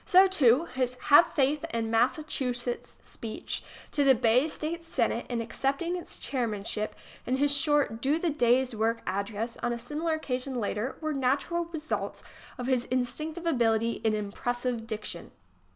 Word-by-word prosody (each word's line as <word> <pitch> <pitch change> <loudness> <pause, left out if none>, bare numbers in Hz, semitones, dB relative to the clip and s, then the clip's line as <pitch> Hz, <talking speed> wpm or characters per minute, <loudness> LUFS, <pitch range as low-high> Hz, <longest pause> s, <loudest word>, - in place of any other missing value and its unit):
So, 370 +1 +7
too, 300 -6 +4
his 255 -3 -2
"Have 290 +4 +8
Faith 290 +1 +2
in 225 -1 -1
Massachusetts" 245 -1 0
speech 225 -2 -5 0.3
to 290 - +2
the 270 -1 +6
Bay 240 +5 +3
State 320 +2 -4
Senate, 330 - -1
in 240 -2 -1
accepting 275 +9 -1
its 355 - -6
chairmanship, 215 -4 -2 0.3
and 255 +2 +1
his 285 +1 +3
short 285 -6 +1
"Do 285 +4 +2
the 335 -1 0
Day's 250 -2 +3
Work" 225 +1 0
address 205 +4 -3
on 240 - -1
a - - -3
similar 310 +6 -2
occasion 260 -3 -3
later, 215 +3 -2
were 310 -1 -1
natural 280 +6 0
re 330 -1 -6
sults 315 +1 -4 0.3
of 250 - -4
his 255 -1 +1
instinctive 305 +7 -2
ability 230 -6 +2
in 220 -1 +2
impressive 235 +3 -2
diction. 210 -6 -4
255 Hz, 155 wpm, -29 LUFS, 230-300 Hz, 0.3 s, Have